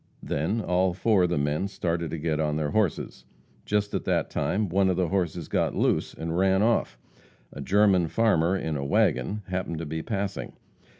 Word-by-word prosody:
Then 95 +11 -1
all 90 -1 +1
four 100 -2 +3
of - - -1
the 85 - 0
men 75 +6 0
started 85 -4 -2
to 80 - -4
get 80 -1 -1
on 75 -1 0
their 75 -1 -1
horses. 105 -7 -1 0.4
Just 105 0 0
at - - -1
that - - 0
time 105 +1 0
one 95 +2 +2
of 90 - +1
the 90 -3 +1
horses 90 -4 -1
got - - 0
loose - - 0
and 80 0 -4
ran 95 +2 +3
off. 115 - +1 0.6
A 70 - -7
German 95 +2 +3
farmer, 95 -3 +2
in 80 -4 -3
a 70 - -3
wagon, 100 +8 +1
happened 90 -3 -3
to 80 - -4
be 80 +1 -4
passing. 100 +1 -4
90 Hz, 190 wpm, -26 LUFS, 80-100 Hz, 0.6 s, four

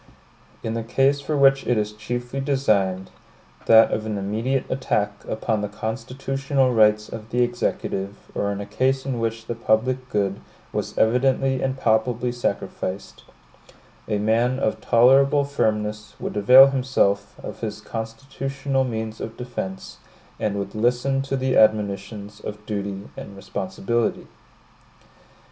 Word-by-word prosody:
In 110 - -2
the 115 - -2
case 135 +5 +2
for 150 +1 -2
which 135 0 +4
it 120 - +2
is 105 0 -1
chiefly 120 +4 -4
designed, 105 -10 +1 0.6
that 110 0 +7
of 105 - -1
an 105 -1 -2
immediate 110 +7 -1
attack 105 -6 0 0.2
upon 110 -1 -1
the 105 - -2
constitutional 130 +5 -1
rights 105 -1 +4
of 110 -1 -8
the 125 +1 +2
Executive, 100 -4 -2 0.2
or 100 0 -1
in 100 - -4
a - - -5
case 130 +5 0
in 130 -3 -2
which 115 0 -2
the 120 - -3
public 125 +3 0
good 100 -3 -1 0.3
was - - -3
evidently 130 +3 +2
and 130 0 -1
palpably 120 +1 +1
sacrificed, 100 -5 -4 0.8
a 105 - 0
man 115 +5 +2
of 110 - -1
tolerable 135 +4 +5
firmness 105 -6 -2
would - - -5
avail 125 +6 +9
himself 100 -7 +1
of - - -7
his - - -4
constitutional 135 +4 -3
means 110 -3 -4
of 115 - -6
defense, 95 -6 -6 0.4
and 105 -2 -1
would 100 0 -4
listen 125 +4 +1
to 135 0 -2
the 130 0 0
admonitions 105 -1 +1
of 105 0 -8
duty 100 -2 -4
and 100 - -9
responsibility. 100 +4 -2
115 Hz, 140 wpm, -23 LUFS, 105-130 Hz, 0.8 s, avail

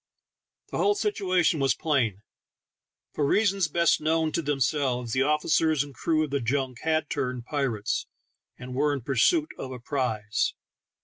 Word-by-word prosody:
The - - -2
whole 410 - +3
situation 185 - +1
was 135 -2 +2
plain. 120 -10 0 0.9
For 150 - -1
reasons 195 +3 +2
best 170 +1 +2
known 160 0 +1
to 170 - -1
themselves, 135 -4 0
the 130 - +2
officers 150 +1 +2
and 145 -1 -11
crew 155 +6 +1
of 150 - -4
the 140 - +1
junk 130 +1 -1
had 160 -1 0
turned 125 -3 -3
pirates, 130 -8 -2 0.5
and 125 +1 -8
were 145 +3 +1
in 140 - -3
pursuit 300 - +2
of 130 - -5
a 130 - -6
prize. 115 -5 -1
145 Hz, 150 wpm, -26 LUFS, 125-160 Hz, 0.9 s, whole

